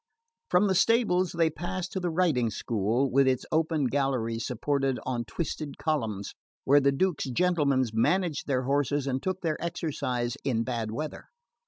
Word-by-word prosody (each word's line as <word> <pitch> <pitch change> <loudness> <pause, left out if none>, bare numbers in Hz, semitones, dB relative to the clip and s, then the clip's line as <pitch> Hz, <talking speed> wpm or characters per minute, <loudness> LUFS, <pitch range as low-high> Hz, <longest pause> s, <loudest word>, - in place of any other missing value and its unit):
From 180 +3 +4
the 195 - +2
stables 185 -3 +3
they 165 -1 +2
passed 175 +3 -4
to 190 - -2
the 180 -1 -1
riding 160 -9 +2
school, 115 +5 0
with 135 +1 +4
its 130 -1 +1
open 160 -2 +1
galleries 125 -4 -1
supported 135 +1 0
on 120 -2 -2
twisted 155 -3 -4
columns, 110 -11 -2 0.3
where 145 +2 +5
the 140 0 +4
duke's 175 +3 0
gentlemen 140 -1 +2
managed 165 +7 +1
their 130 -2 +1
horses 140 +1 0
and 135 -1 -1
took 185 0 -2
their 160 -2 -2
exercise 130 -8 -2
in 120 -4 0
bad 115 -3 -3
weather. 150 +8 -5
140 Hz, 160 wpm, -28 LUFS, 125-170 Hz, 0.3 s, where